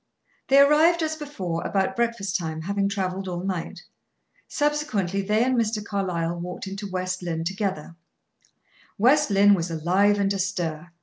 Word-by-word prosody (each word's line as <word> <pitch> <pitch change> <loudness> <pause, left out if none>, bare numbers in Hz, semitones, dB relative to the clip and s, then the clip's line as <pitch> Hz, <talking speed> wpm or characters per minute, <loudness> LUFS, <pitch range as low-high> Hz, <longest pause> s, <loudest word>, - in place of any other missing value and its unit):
They 270 - +4
arrived, 315 +4 +5
as 315 0 -1
before, 195 - -4
about 200 +6 0
breakfast 230 -5 -1
time, 160 -3 -2
having 200 +3 -1
traveled 190 -1 -3
all 175 -1 -4
night. 185 -3 -4 0.6
Subsequently, 270 - -1
they 210 +3 +1
and 260 +1 +1
Mr. 220 -3 -1
Carlyle 175 -4 -2
walked 180 +2 -6
into 195 +1 -6
West 185 0 -3
Lynne 165 -2 -3
together. 190 -3 -3 1.0
West 280 +7 +4
Lynne 200 0 +5
was 175 -3 0
alive 185 +6 +2
and 200 0 +1
astir. 175 -4 -3
195 Hz, 145 wpm, -24 LUFS, 180-225 Hz, 1.0 s, arrived